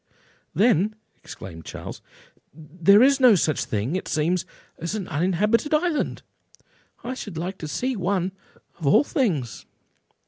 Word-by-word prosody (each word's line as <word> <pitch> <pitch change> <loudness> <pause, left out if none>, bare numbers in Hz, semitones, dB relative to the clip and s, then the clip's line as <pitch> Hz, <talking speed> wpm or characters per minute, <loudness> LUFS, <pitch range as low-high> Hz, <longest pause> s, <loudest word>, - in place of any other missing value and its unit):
"Then," 215 -1 +3 0.3
exclaimed 80 -4 -9
Charles, - - -8 0.5
"there 175 +7 +4
is 275 +1 +4
no 250 -5 +7
such 155 -4 0
thing, 110 - -2
it 185 - -3
seems, 165 +3 0 0.3
as 170 +5 -3
an 200 -4 -4
uninhabited 205 - +1
island? 315 0 -1 0.8
I 250 - -3
should 205 -9 -7
like 185 +4 -4
to 155 - -5
see 255 - -2
one, 190 -1 -1 0.5
of 155 - -3
all 140 - +6
things." 170 - -2
185 Hz, 135 wpm, -24 LUFS, 160-230 Hz, 0.8 s, no